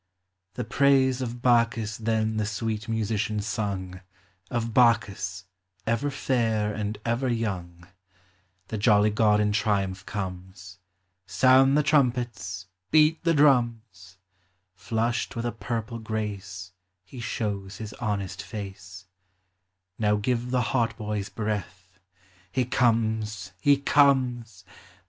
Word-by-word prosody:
The 125 - -2
praise 130 +1 +3
of 120 -1 -5
Bacchus 115 -3 +2
then 110 -1 0
the 110 - 0
sweet 110 +1 -3
musician 110 -1 -1
sung, 100 -3 -3 0.5
Of 115 -1 -2
Bacchus 100 -7 +2 0.2
— 95 0 -42
ever 145 +4 -2
fair 115 -6 0
and 105 0 -3
ever 120 +3 0
young: 90 -7 -3 0.8
The 110 - -3
jolly 105 -1 +4
god 105 0 +3
in 105 0 +2
triumph 100 -3 0
comes; 95 -1 -7 0.5
Sound 135 +4 +5
the 150 - +3
trumpets; 120 - 0 0.2
beat 155 +1 +4
the 165 -1 +2
drums: 115 -10 +1 0.6
Flushed 115 +6 -2
with 115 0 -3
a 120 - 0
purple 115 0 -4
grace 100 -4 -5 0.3
He 110 +8 -11
shows 100 -5 -3
his 110 -1 -7
honest 100 -5 -3
face: 95 -3 -8 0.9
Now 105 -1 +3
give 120 +3 -1
the 125 0 +1
hautboys 105 -4 -1
breath. 95 -3 -5 0.5
He 130 +3 0
comes! 110 -5 0
he 145 +4 +4
comes 125 -9 +2
110 Hz, 115 wpm, -26 LUFS, 100-120 Hz, 0.9 s, Sound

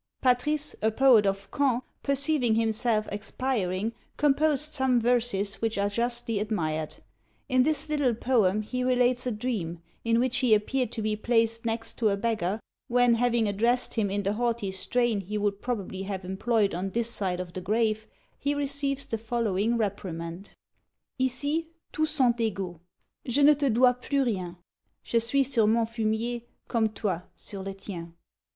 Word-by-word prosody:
Patris, 285 +4 +1
a 220 - +3
poet 230 -3 +5
of 195 0 -2
Caen, 260 -3 +1 0.2
perceiving 275 -4 +2
himself 225 -1 +1
expiring, 210 -1 -2 0.2
composed 300 +1 +2
some 265 -4 +2
verses 230 -4 +1
which 225 -2 0
are 200 0 +1
justly 235 0 -1
admired. 160 -8 -2 0.5
In 255 0 +3
this 305 +4 +2
little 290 -6 +1
poem 215 -4 +2
he 250 +4 -3
relates 250 0 +2
a - - 0
dream, 210 -7 -3 0.2
in 230 0 +2
which 255 +1 +2
he 245 -5 +5
appeared 245 +3 -1
to 220 - -3
be 215 0 0
placed 230 +1 +1
next 225 0 -3
to 220 -3 +3
a 200 - 0
beggar, 210 -2 -1 0.3
when, 245 0 +4
having 235 -1 +2
addressed 235 +5 +1
him 215 -4 0
in 200 +1 -1
the 200 +1 0
haughty 230 -3 -1
strain 235 +3 0
he 205 +3 -4
would 205 -1 -1
probably 200 -6 -3
have 195 -1 -5
employed 205 +2 +1
on 185 +3 -2
this 235 +3 -1
side 185 -5 -1
of 180 -1 -6
the 185 - -5
grave, 215 +2 0 0.3
he 285 +1 0
receives 280 -1 -1
the 225 - -3
following 225 -1 0
reprimand: 185 -4 -4 0.7
Ici 285 +6 0 0.3
tous 310 0 +1
sont 260 -6 +3
égaux; 190 -6 -2 0.5
je 265 +4 +2
ne 295 +1 +8
te 285 -1 0
dois 250 +2 +5
plus 270 +3 -1
rien; 185 -7 -2 0.5
Je 235 - +1
suis 255 +5 +2
sur 235 -5 +2
mon 225 +1 +3
fumier 230 +1 -2 0.3
comme 225 -3 +1
toi 200 -5 -2
sur 200 -2 -7
le 195 0 -5
tien. 170 -4 -8
230 Hz, 165 wpm, -27 LUFS, 205-250 Hz, 0.7 s, ne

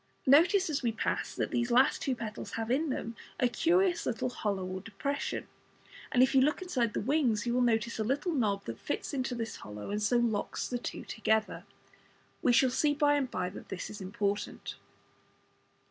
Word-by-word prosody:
Notice 345 +8 +5
as 305 -3 -1
we 235 -3 +1
pass 225 - -2
that - - -2
these 240 0 +1
two 240 - -1
last 265 +2 +3
petals 215 -2 -6
have 225 +1 -2
in 300 +4 +1
them 230 -3 -3 0.2
a 250 - +4
curious 350 +8 +2
little 250 +1 -1
hollow 200 -6 -2
or 185 +1 -5
depression, 280 +8 -3 0.6
and 250 - +5
if 260 - +2
you 265 - +6
look 295 +3 +2
inside 255 -12 -1
the - - +1
"wings" 245 -5 +1
you 240 - 0
will 250 - +2
notice 230 -1 +1
a - - +1
little 285 - 0
knob 210 -8 0
that 115 0 -6
fits - - -3
into 260 -2 -1
this 230 -1 -4
hollow, 105 - -8
and 210 +1 -1
so 210 +4 +3
locks 230 -4 0
the 245 - -2
two - - -6
together. 220 -1 0 0.8
We 250 - +4
shall 255 +1 +4
see 290 +3 +2
by 290 -1 +4
and 280 -3 +1
by 180 -5 -2
that - - -11
this 190 - -5
is 210 -1 -8
important. 200 +2 -3
240 Hz, 195 wpm, -31 LUFS, 215-275 Hz, 0.8 s, you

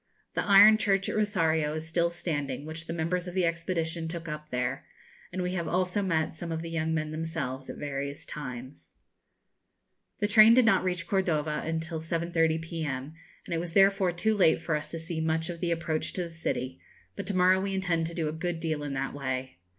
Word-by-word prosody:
The - - 0
iron 205 +1 +8
church 195 -2 +2
at - - -2
Rosario 160 -8 +1
is 155 0 -5
still 170 +1 +1
standing, 145 -5 -3
which 160 +2 -7
the - - -4
members 170 +2 -1
of 180 - -7
the 185 -2 +3
expedition 165 -1 -2
took 165 0 -6
up 150 -1 -6
there, 125 +2 -2 0.5
and 185 0 -2
we 180 0 -2
have 170 -3 -2
also 180 +3 0
met 165 -5 0
some 165 +1 -6
of 160 0 -3
the 165 - -6
young 160 -1 -1
men 155 -1 -1
themselves 155 -5 -4
at - - -6
various 140 0 -4
times. 130 -2 -8 1.2
The 205 - +1
train 215 +2 +8
did 255 -2 +6
not 230 - +4
reach 180 -2 -1
Cordova 155 -6 0
until 160 +1 -3
7.30 165 -1 0
p.m., 155 -4 -4 0.3
and - - -4
it 165 - 0
was 170 -1 -5
therefore 195 -1 +4
too 215 +6 +1
late 180 -6 +4
for 165 -1 -1
us 150 - -4
to 165 - -5
see 165 0 -4
much 160 +2 0
of 170 - -8
the 175 - -1
approach 165 -2 -1
to 180 - -2
the 170 - -7
city, 130 - -3 0.3
but - - -6
to 200 - -2
morrow 185 +1 +5
we 195 0 -2
intend 170 -4 0
to 170 - -7
do 160 -3 -1
a 150 - -2
good 165 +1 -3
deal 160 -2 -2
in 145 -2 -4
that 135 +1 -2
way. 130 -7 -4
165 Hz, 210 wpm, -29 LUFS, 155-180 Hz, 1.2 s, iron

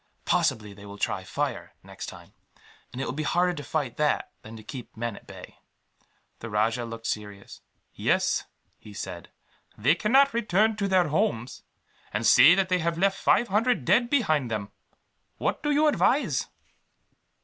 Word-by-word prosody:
Possibly 105 -2 0
they 100 0 -14
will 100 0 -10
try - - -2
fire, - - -4
next - - -9
time; - - -12 0.6
and 125 - -8
it 135 - -2
will - - -3
be 150 - -3
harder 175 +4 +1
to 150 -4 -7
fight 135 -3 -3
that 150 -1 0
than 110 +1 -11
to 110 - -12
keep 125 -1 -9
men 120 -1 -3
at - - -15
bay." - - -12 0.8
The 115 - -7
rajah 110 +3 0
looked 115 0 -8
serious. 105 -2 -6 0.3
"Yes," - - 0 0.3
he 105 -1 -13
said, 85 -4 -7 0.5
"they 130 +8 +3
cannot 265 +10 +3
return 220 -1 +2
to 200 -2 -1
their 185 -4 +2
homes, 120 -5 -1 0.5
and 110 +2 -2
say 150 +9 +8
that 195 0 +1
they 185 -1 +1
have 170 0 -1
left 195 +2 +1
five 240 - +2
hundred 215 - +1
dead 240 - +3
behind 155 - +1
them. 105 -2 -4 0.7
What - - -2
do 295 - -2
you 295 +1 +3
advise?" 260 - +2
150 Hz, 170 wpm, -26 LUFS, -, 0.8 s, say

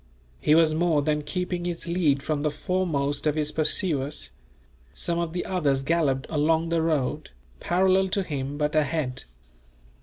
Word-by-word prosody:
He 150 - +4
was 160 -1 +5
more 160 -2 +2
than 150 0 0
keeping 180 +3 -3
his 175 -2 -4
lead 155 -6 +1
from 150 -2 -1
the 150 - +1
foremost 150 -4 -1
of 150 - +1
his 150 -1 -1
pursuers 150 - -1 0.6
Some 170 0 0
of 170 -1 -2
the 175 - -2
others 145 -8 0
galloped 140 -4 +1
along 160 +2 +1
the 165 -1 +1
road, 150 -2 -1 0.3
parallel 190 +1 +2
to 195 +1 0
him, 140 -3 -4
but 150 +1 -1
ahead. 145 -4 0
155 Hz, 155 wpm, -26 LUFS, 145-170 Hz, 0.6 s, was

